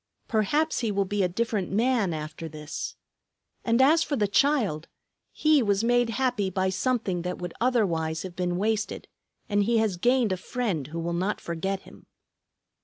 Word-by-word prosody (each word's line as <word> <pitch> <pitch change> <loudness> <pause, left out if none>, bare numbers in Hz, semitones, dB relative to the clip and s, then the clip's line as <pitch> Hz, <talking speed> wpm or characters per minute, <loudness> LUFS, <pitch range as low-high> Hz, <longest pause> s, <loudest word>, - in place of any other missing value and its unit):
Perhaps 290 +9 +1
he 230 -3 0
will 200 -1 +1
be 205 +1 -1
a 185 - +3
different 210 -1 -1
man 225 -2 +2
after 155 +1 -5
this. 150 0 -6 0.7
And 230 +1 +2
as 315 +4 +5
for 290 - 0
the 210 -5 +1
child; 205 - +2 0.4
he 305 -2 +3
was 205 -2 +1
made 245 0 +3
happy 235 -4 0
by 190 0 0
something 205 -4 0
that 180 +1 -3
would 175 -1 -6
otherwise 170 -10 +1
have 185 -2 -7
been 180 -1 -1
wasted, 215 +2 -1 0.4
and 205 -1 +2
he 235 +1 +2
has 220 -5 +1
gained 245 +2 +2
a 185 - 0
friend 190 - -2
who 160 +3 -7
will 170 +1 -2
not 185 +4 -1
forget 190 +4 -3
him. - - -16
205 Hz, 175 wpm, -27 LUFS, 175-240 Hz, 0.7 s, as